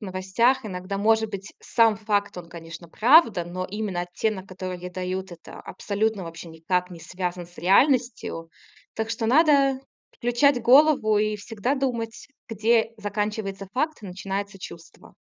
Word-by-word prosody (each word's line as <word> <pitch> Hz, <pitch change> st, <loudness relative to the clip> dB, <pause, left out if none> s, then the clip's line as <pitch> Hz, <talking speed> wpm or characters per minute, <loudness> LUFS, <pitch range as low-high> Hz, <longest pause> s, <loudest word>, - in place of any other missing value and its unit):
новостях, 205 Hz, +7 st, +1 dB
иногда 185 Hz, 0 st, -5 dB
может 220 Hz, +1 st, +2 dB
быть 200 Hz, +1 st, -7 dB
сам 225 Hz, -2 st, +3 dB
факт, 205 Hz, -2 st, -1 dB
он, 170 Hz, -1 st, -8 dB
конечно, 165 Hz, 0 st, -10 dB
правда, 230 Hz, -, +5 dB
но 180 Hz, +1 st, -5 dB
именно 200 Hz, -2 st, -3 dB
оттенок, 190 Hz, +2 st, -3 dB
который 185 Hz, -1 st, -6 dB
ей 180 Hz, +1 st, -7 dB
дают, 185 Hz, +1 st, -4 dB
это 175 Hz, -1 st, -11 dB
абсолютно 210 Hz, -2 st, -2 dB
вообще 165 Hz, +1 st, -9 dB
никак 180 Hz, +3 st, -2 dB
не 175 Hz, -, -9 dB
связан 180 Hz, +1 st, -5 dB
с 175 Hz, -, -21 dB
реальностью. 230 Hz, -, +2 dB, 0.5 s
Так 220 Hz, 0 st, -3 dB
что 225 Hz, 0 st, -2 dB
надо 275 Hz, 0 st, +4 dB, 0.3 s
включать 245 Hz, +2 st, +2 dB
голову 255 Hz, -3 st, +5 dB
и 215 Hz, 0 st, 0 dB
всегда 225 Hz, +5 st, -2 dB
думать, 235 Hz, -4 st, -3 dB, 0.2 s
где 225 Hz, +1 st, +2 dB
заканчивается 205 Hz, -1 st, -3 dB
факт 300 Hz, 0 st, -2 dB
и 205 Hz, -, -7 dB
начинается 195 Hz, +1 st, -5 dB
чувство. 170 Hz, -2 st, -12 dB
205 Hz, 145 wpm, -25 LUFS, 185-230 Hz, 0.5 s, правда